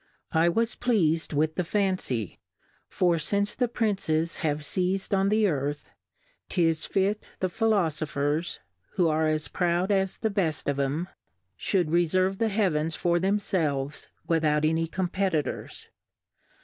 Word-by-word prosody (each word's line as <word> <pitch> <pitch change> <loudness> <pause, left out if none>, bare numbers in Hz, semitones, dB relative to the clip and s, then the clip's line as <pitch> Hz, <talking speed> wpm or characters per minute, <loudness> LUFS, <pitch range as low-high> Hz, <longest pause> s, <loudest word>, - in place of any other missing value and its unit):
I 165 +2 +3
was 230 +6 0
pleas'd 170 -10 +1
with 155 +1 +1
the 180 - -1
Fancy; 185 - -1 0.5
for 175 -2 +2
fince 200 +6 0
the 250 - +1
Princes 190 -8 0
have 150 -1 -1
feiz'd 185 +5 -1
on 195 0 +3
the 215 +1 +3
Earth; 145 -4 -2 0.6
'tis 165 -3 +1
fit 200 +2 0 0.2
the 185 - 0
Philofophers 160 -7 0 0.4
(who 175 - +3
are 155 0 +2
as 155 -1 0
proud 180 +2 0
as 190 -1 +1
the 220 - -1
beft 170 -6 -1
of 140 -1 0
'em) 145 +6 -1 0.5
fhould 180 -5 +1
referve 185 +3 +2
the 225 - +2
Heavens 165 -7 +1
for 175 0 +1
themfelves 165 -8 -1 0.2
without 155 -2 +2
any 160 +1 +1
Competitors. 185 -2 -2
170 Hz, 135 wpm, -27 LUFS, 155-195 Hz, 0.6 s, I